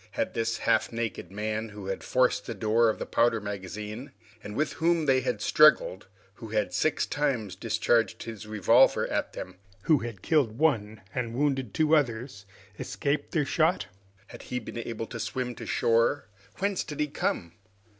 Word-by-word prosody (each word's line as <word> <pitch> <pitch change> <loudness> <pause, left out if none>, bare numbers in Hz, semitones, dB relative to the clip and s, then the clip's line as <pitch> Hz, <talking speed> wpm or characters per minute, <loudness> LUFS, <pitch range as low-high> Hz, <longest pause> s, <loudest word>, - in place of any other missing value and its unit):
Had - - -2
this 115 0 -1
half - - +1
naked 115 -6 -4
man, 110 +2 -3
who 105 -2 -9
had 95 0 -4
forced 130 0 +1
the 115 - -4
door 110 +3 +3
of 110 - -1
the - - -4
powder 115 -1 +2
magazine, 105 +5 -6 0.3
and 105 - -7
with 150 +3 0
whom 165 -1 +1
they 130 -2 +3
had 110 -5 -2
struggled, 150 -11 +4 0.3
who 115 - -10
had 105 -1 -1
six 155 - +1
times 130 -10 -1
discharged 115 -1 +1
his 110 -2 -8
revolver 105 -4 +4
at - - -2
them, 95 0 -8 0.3
who 155 -4 +4
had 115 -5 -7
killed 135 -9 +2
one 110 -9 +1
and 120 -2 -3
wounded 135 -4 0
two 155 0 +3
others, 120 -7 -1 0.3
escaped 140 +1 -2
their 150 -4 +1
shot? 160 +5 +2 0.4
Had - - -10
he 125 - -4
been 120 0 -6
able 115 -1 -4
to 115 - -8
swim 125 +1 -3
to - - -9
shore? 115 +5 +2 0.3
Whence 200 0 -1
did 150 - -8
he 150 - +3
come? 85 - -2
115 Hz, 175 wpm, -28 LUFS, 105-140 Hz, 0.4 s, struggled